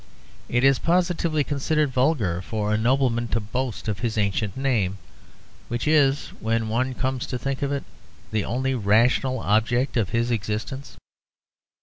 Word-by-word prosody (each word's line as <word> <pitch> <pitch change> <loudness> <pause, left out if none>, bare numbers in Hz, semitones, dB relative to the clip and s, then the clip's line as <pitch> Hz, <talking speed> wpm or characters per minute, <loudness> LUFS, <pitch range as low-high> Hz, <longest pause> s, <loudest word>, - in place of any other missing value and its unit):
It 120 +1 +1
is 135 -1 +5
positively 170 -3 +1
considered 145 +1 0
vulgar 125 - +1
for 105 0 -2
a - - +3
nobleman 120 +1 +1
to 115 - 0
boast 120 +3 -4
of 105 -2 -2
his 115 -2 -2
ancient 105 +2 0
name, 110 -9 0 0.7
which 120 +3 -3
is, 145 -2 +3
when 115 0 0
one 125 +3 0
comes 130 -1 -2
to 125 - -3
think 135 +2 -3
of 140 0 0
it, 140 -1 -2 0.5
the 110 -2 0
only 130 +4 -1
rational 120 +4 +2
object 120 +6 +1
of 105 -5 +1
his 120 +1 0
existence. 115 +5 -3
120 Hz, 150 wpm, -24 LUFS, 110-135 Hz, 0.7 s, is